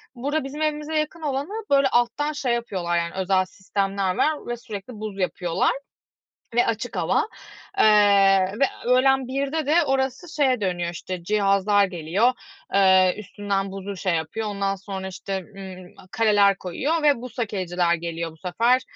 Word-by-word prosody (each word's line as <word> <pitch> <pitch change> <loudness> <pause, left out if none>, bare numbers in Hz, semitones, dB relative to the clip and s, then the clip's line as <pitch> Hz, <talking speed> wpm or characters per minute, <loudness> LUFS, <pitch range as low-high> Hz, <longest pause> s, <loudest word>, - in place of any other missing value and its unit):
Burada 285 +4 -1
bizim 285 +3 -6
evimize 305 0 -1
yakın 310 +2 -4
olanı 285 +2 -2 0.2
böyle, 275 -1 +4
alttan 245 +5 +1
şey 255 -5 -1
yapıyorlar 185 -7 -1
yani, 170 0 -2
özel 190 0 +1
sistemler 195 0 -2
var 310 -1 0
ve 240 0 -3
sürekli 225 -1 -8
buz 210 -2 -6
yapıyorlar 180 -2 0 0.8
ve 240 - +4
açık 230 +2 -3
hava, - - +1 0.5
eee, - - +5 0.8
ve 275 - +5 0.2
öğlen 260 +1 +3
1'de 280 +4 -2
de 325 +3 +4
orası 270 +5 -1
şeye 260 -6 +2
dönüyor 175 -3 -1
işte, 180 +1 -6
cihazlar 200 +1 +3
geliyor, 185 +7 +1 0.4
eee, 190 -2 +5
üstünden 200 -1 -3
buzu 195 +1 -6
şey 185 -2 0
yapıyor, 160 +8 -3
ondan 200 -1 -1
sonra 190 0 -6
işte, 190 +1 -4 0.2
ımm, 185 -2 -10 0.2
kaleler 205 -3 +4
koyuyor 285 - -2
ve 285 -5 +3
buz 250 0 -9
hokeyciler 180 -6 0
geliyor 170 -1 -4
bu 160 - -18
sefer. 235 +9 +2
205 Hz, 150 wpm, -24 LUFS, 185-265 Hz, 0.8 s, eee